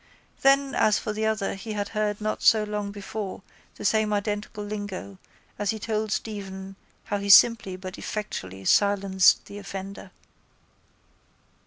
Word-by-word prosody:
Then 275 0 +4
as 215 -2 +3
for 215 - -3
the 220 +1 -1
other 215 -2 -1
he 215 +3 -6
had 205 -1 -3
heard 210 -1 -1
not 215 0 -2
so 220 -2 +5
long 210 -1 -3
before 200 -1 -6 0.3
the - - -8
same 215 +1 +2
identical 210 +1 -3
lingo 205 -2 -6 0.4
as 205 -1 -1
he 220 - 0
told 215 -1 -2
Stephen 195 -3 -5 0.3
how 205 - -2
he 200 0 -4
simply 205 -2 +6
but 185 0 -8
effectually 95 - -5
silenced 195 - +4
the 205 - -9
offender. 195 -1 -7
205 Hz, 145 wpm, -26 LUFS, 195-215 Hz, 0.4 s, simply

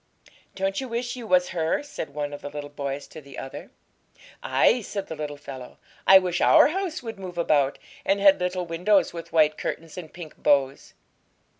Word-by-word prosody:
'Don't 195 +3 -1
you 265 - -5
wish 245 +1 -3
you 240 -3 -8
was 180 -1 +3
her?' 165 - -1
said 285 - -6
one 145 0 -4
of 145 - -8
the 145 - -6
little 145 0 -7
boys 140 -1 -4
to 155 - -11
the 140 -1 -13
other. 135 - -8 0.7
'Ay!' 370 - +3
said 200 -1 -5
the 160 - -7
little 150 -1 -5
fellow; 130 -3 -10 0.3
'I 190 - +10
wish 180 -2 0
our 310 -2 +7
house 360 -4 -3
would 225 -4 -7
move 180 -2 -8
about, 145 -5 +2 0.3
and 200 - +1
had 195 -1 +6
little 180 0 -1
windows 180 +5 +2
with 170 -1 -8
white 155 -1 +3
curtains 165 +2 -5
and 160 -3 -10
pink 170 -3 -10
bows!' 140 -1 +1
175 Hz, 190 wpm, -25 LUFS, 145-195 Hz, 0.7 s, I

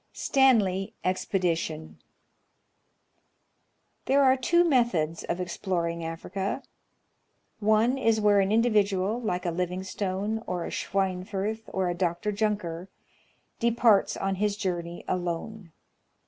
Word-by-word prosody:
Stanley 210 -9 +2
Expedition. 170 -4 -1 2.1
There 275 +1 +4
are 260 -1 +5
two 345 +7 +3
methods 235 - +1
of 175 - -2
exploring 170 -2 -2
Africa. 190 +8 -4 1.0
One 220 +5 +3
is 225 -3 +2
where 205 -1 +4
an 195 0 +2
individual, 215 -1 +2
like 180 -5 -2
a 175 - 0
Livingstone, 190 +4 -2
or 180 -2 -2
a - - -6
Schweinfurth, 195 +3 -2
or 190 -1 0
a 175 - 0
Dr. 175 +3 -1
Junker, 200 -4 -2 0.7
departs 230 -3 +3
on 195 0 -1
his 205 +1 0
journey 175 -4 -4
alone. 180 +2 -4
195 Hz, 105 wpm, -27 LUFS, 180-220 Hz, 2.1 s, are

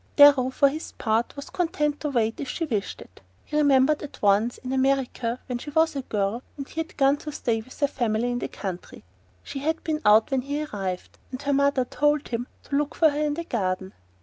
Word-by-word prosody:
Darrow, 285 -3 +7
for 280 +2 +4
his 305 +3 -4
part, 225 +1 0
was 280 - -8
content 300 -4 0
to 300 - -2
wait 230 -4 0
if 275 - -4
she 330 - -2
wished 210 -10 -3
it. 90 - -15 0.2
He 300 - -6
remembered 285 0 +4
that 295 - -9
once, 210 +4 +3
in 255 0 -5
America, 260 -3 0
when 245 -1 -3
she 295 - -7
was 320 +1 +2
a 275 - -1
girl, 210 -1 -1 0.2
and 275 -1 -6
he 320 - -7
had 320 - -5
gone 275 0 +4
to 300 +1 -7
stay 230 -5 -1
with 255 +4 -15
her 285 - +4
family 240 -2 -1
in 245 - -1
the - - -3
country, 185 -3 -7 0.4
she 275 - -6
had 320 +4 -1
been 310 -1 -1
out 215 +5 +5
when 265 -1 +2
he 285 +3 -3
arrived, 195 -9 -5
and 255 - -6
her 285 0 +1
mother 280 -1 +3
had 250 - -5
told 295 0 +1
him 240 +1 -3 0.2
to 280 - -4
look 295 +1 0
for 320 -2 +5
her 295 +1 -2
in 295 -1 0
the 335 - -4
garden. 190 - -2
270 Hz, 230 wpm, -25 LUFS, 230-295 Hz, 0.4 s, Darrow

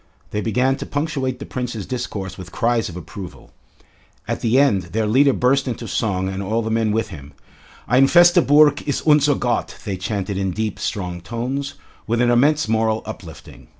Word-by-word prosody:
They 105 - -2
began 125 +5 +1
to - - -6
punctuate 140 -4 -2
the - - -8
Prince's 120 -5 -4
discourse 100 -7 -5
with 90 -2 -10
cries 115 +3 0
of 85 - -8
approval. 90 0 -10 0.8
At - - -3
the 115 +2 +2
end 135 -9 +4
their 110 0 +1
leader 135 +6 +4
burst 135 +2 +1
into 120 - -4
song 95 -4 -1
and 95 +1 -4
all 110 +4 -1
the 110 - -3
men 110 -1 +1
with 110 +2 -1
him. 70 -6 -11 0.5
"Ein 130 +3 +5
feste 175 +2 +5
Burg 145 0 +5
ist 145 - -2
unser 150 -1 +5
Gott," 120 -1 -2
they 100 -3 -3
chanted 100 0 -3
in 95 -1 -1
deep, 110 +1 -3
strong 90 -5 -4
tones, 125 +8 -4 0.3
with 115 +1 0
an 120 0 +3
immense 145 +3 +3
moral 110 0 +1
uplifting. 90 -8 -10
115 Hz, 185 wpm, -21 LUFS, 100-135 Hz, 0.8 s, Ein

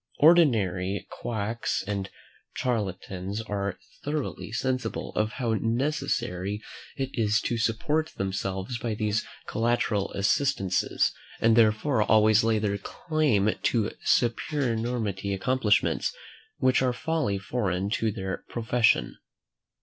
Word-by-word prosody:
Ordinary 105 - +4
quacks 110 -1 -2
and 100 -1 -3 0.5
charlatans 100 -4 -2
are 100 -3 -3 0.3
thoroughly 145 -6 -3
sensible 125 0 -2 0.2
how 120 -4 -1
necessary 115 - -1 0.4
it 135 -1 -2
is 110 -1 +2
to 120 - -1
support 150 +8 0
themselves 95 +4 -2
by 115 -1 -2
these 105 0 0 0.2
collateral 115 -3 0
assistances, 100 -2 +1 0.3
and 115 0 +4
therefore 110 +3 +3
always 110 +1 +5
lay 115 -1 +3
their 100 -1 -1
claim 145 - +1
to 110 -3 +1
some - - -16 0.4
supernumerary 115 -8 -2
accomplishments, 110 0 +2 0.5
which 130 0 +3
are 130 -1 +2
wholly 150 -8 -1
foreign 100 -2 -2
to 110 -1 +1
their 95 -2 -4
profession. 115 - +2
110 Hz, 105 wpm, -27 LUFS, 100-125 Hz, 0.5 s, always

